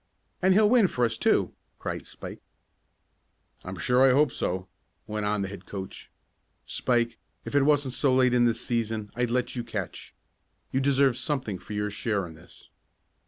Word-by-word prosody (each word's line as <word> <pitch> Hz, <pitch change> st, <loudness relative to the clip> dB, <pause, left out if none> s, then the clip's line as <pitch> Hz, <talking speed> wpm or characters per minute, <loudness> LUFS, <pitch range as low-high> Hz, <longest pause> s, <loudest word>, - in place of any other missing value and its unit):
"And 185 Hz, 0 st, +4 dB
he'll 215 Hz, 0 st, +6 dB
win 230 Hz, -3 st, +5 dB
for 125 Hz, -7 st, +1 dB
us, 115 Hz, -1 st, -1 dB
too!" -, -, +2 dB, 0.2 s
cried -, -, -5 dB
Spike. -, -, -9 dB, 1.2 s
"I'm 90 Hz, +1 st, -6 dB
sure 125 Hz, +9 st, +2 dB
I 135 Hz, -, +7 dB
hope 140 Hz, +1 st, +4 dB
so," 95 Hz, +1 st, -2 dB, 0.4 s
went 105 Hz, -1 st, -2 dB
on 105 Hz, -1 st, 0 dB
the -, -, -2 dB
head 100 Hz, -1 st, -10 dB
coach. 95 Hz, -2 st, -7 dB, 0.6 s
"Spike, 120 Hz, -2 st, 0 dB, 0.3 s
if -, -, -6 dB
it 145 Hz, -, +5 dB
wasn't 140 Hz, -2 st, +2 dB
so 140 Hz, 0 st, +2 dB
late 130 Hz, -1 st, +4 dB
in 120 Hz, -1 st, +4 dB
the 115 Hz, -1 st, +3 dB
season 110 Hz, -3 st, -2 dB
I'd 125 Hz, 0 st, 0 dB
let 125 Hz, +2 st, -1 dB
you 120 Hz, -, -2 dB
catch. 105 Hz, -6 st, -6 dB, 0.6 s
You 130 Hz, -, +1 dB
deserve 135 Hz, -2 st, +3 dB
something 130 Hz, -, -2 dB
for 100 Hz, -, -9 dB
your 105 Hz, 0 st, -1 dB
share 105 Hz, -2 st, -1 dB
in 85 Hz, -, -10 dB
this." 80 Hz, -, -16 dB
120 Hz, 175 wpm, -27 LUFS, 105-135 Hz, 1.2 s, I